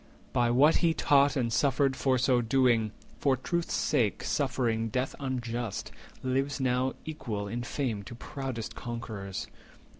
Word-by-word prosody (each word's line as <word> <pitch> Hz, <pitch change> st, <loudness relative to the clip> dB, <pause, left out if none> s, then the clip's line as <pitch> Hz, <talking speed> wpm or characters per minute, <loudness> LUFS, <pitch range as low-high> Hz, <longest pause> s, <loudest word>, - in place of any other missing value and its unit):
By 120 Hz, -1 st, +3 dB
what 140 Hz, +7 st, +5 dB
he 165 Hz, -2 st, +2 dB
taught 140 Hz, 0 st, +4 dB
and 120 Hz, -4 st, 0 dB
suffered 135 Hz, 0 st, +2 dB
for 130 Hz, 0 st, +2 dB
so 125 Hz, -1 st, +3 dB
doing, 115 Hz, -2 st, +3 dB, 0.3 s
For 135 Hz, -2 st, +2 dB
truth's 170 Hz, +6 st, -1 dB
sake 120 Hz, -9 st, +1 dB
suffering 120 Hz, -5 st, 0 dB
death 125 Hz, +4 st, -1 dB
unjust, 120 Hz, -5 st, -3 dB, 0.3 s
lives 135 Hz, +2 st, 0 dB
now 130 Hz, 0 st, +1 dB
Equal 115 Hz, -10 st, -4 dB
in 120 Hz, +4 st, -3 dB
fame 120 Hz, -3 st, -2 dB
to 120 Hz, -, -8 dB
proudest 130 Hz, -3 st, -5 dB
conquerors. 110 Hz, -5 st, -5 dB
125 Hz, 140 wpm, -29 LUFS, 115-135 Hz, 0.3 s, what